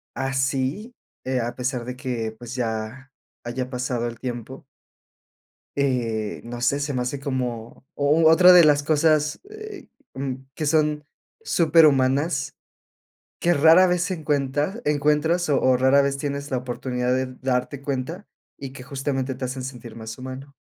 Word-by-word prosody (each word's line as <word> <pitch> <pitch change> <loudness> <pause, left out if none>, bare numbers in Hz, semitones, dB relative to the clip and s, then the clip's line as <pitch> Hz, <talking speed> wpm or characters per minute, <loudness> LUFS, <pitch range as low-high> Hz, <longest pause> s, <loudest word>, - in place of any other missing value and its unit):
así, 135 - -1 0.3
eh, 130 -1 -1
a 120 +1 -3
pesar 125 -1 -3
de 125 +1 -6
que, 120 -4 -4
pues, 120 0 -8
ya 120 +3 -4 0.3
haya 125 +2 -4
pasado 125 -2 -2
el 115 -1 -9
tiempo 125 +1 -6 1.1
eh, 120 -6 -1
no 120 +1 -7
sé, 140 +3 +1
se 145 -1 -2
me 125 - 0
hace 130 +3 -4
como 125 -3 -4
o 145 +3 +2
u 160 - +7
otra 180 +3 +8
de 175 -2 +8
las 145 -1 +4
cosas, 155 0 +2
eh, 430 -2 -10 0.3
mm, 135 -1 -3 0.2
que 155 - -3
son 150 -1 +1 0.4
superhumanas, 145 - +3 0.8
que 175 - +3
rara 165 +4 +6
vez 180 -1 +1
se 185 - -2
encuentra 150 - -1
encuentras 150 +3 +1
o 140 - +3
o 130 0 +4
rara 130 +2 +4
vez 140 0 0
tienes 140 0 -4
la 130 - +1
oportunidad 125 0 -2
de 130 0 0 0.2
darte 130 +2 -1
cuenta 140 +8 -4 0.3
y 135 -1 -7
que, 130 - -10
justamente, 135 -1 -3
te 130 - -8
hacen 130 +1 -5
sentir 120 -3 -8
más 110 -1 -8
humano. 130 +2 -8
135 Hz, 155 wpm, -23 LUFS, 125-150 Hz, 1.1 s, otra